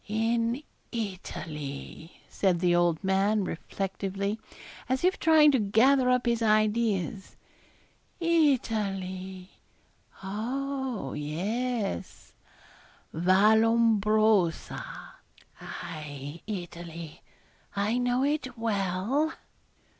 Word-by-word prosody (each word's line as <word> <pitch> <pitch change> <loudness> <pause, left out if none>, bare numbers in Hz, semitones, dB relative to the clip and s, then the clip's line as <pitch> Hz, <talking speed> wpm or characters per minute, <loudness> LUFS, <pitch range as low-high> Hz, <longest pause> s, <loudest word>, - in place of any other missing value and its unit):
'In 230 +4 0 0.3
Italy,' 160 - -6
said 185 -4 +1
the 175 0 +3
old 175 0 +2
man, 195 +2 +2
reflectively, 195 +3 -3 0.5
as 260 +3 0
if 370 +1 +2
trying 310 -2 +6
to 265 - +2
gather 250 +6 +4
up 250 0 +2
his 235 -1 +1
ideas, 215 -3 +1 0.8
'Italy. 195 - 0 0.7
Oh! 250 - -3
yes, 200 - -3 0.8
Vallombrosa 215 +1 +3 0.8
aye, 150 -2 -7
Italy, 170 -5 -7 0.5
I 210 +5 +1
know 245 +1 +1
it 275 -4 -1
well.' 225 - 0
210 Hz, 75 wpm, -28 LUFS, 185-240 Hz, 0.8 s, trying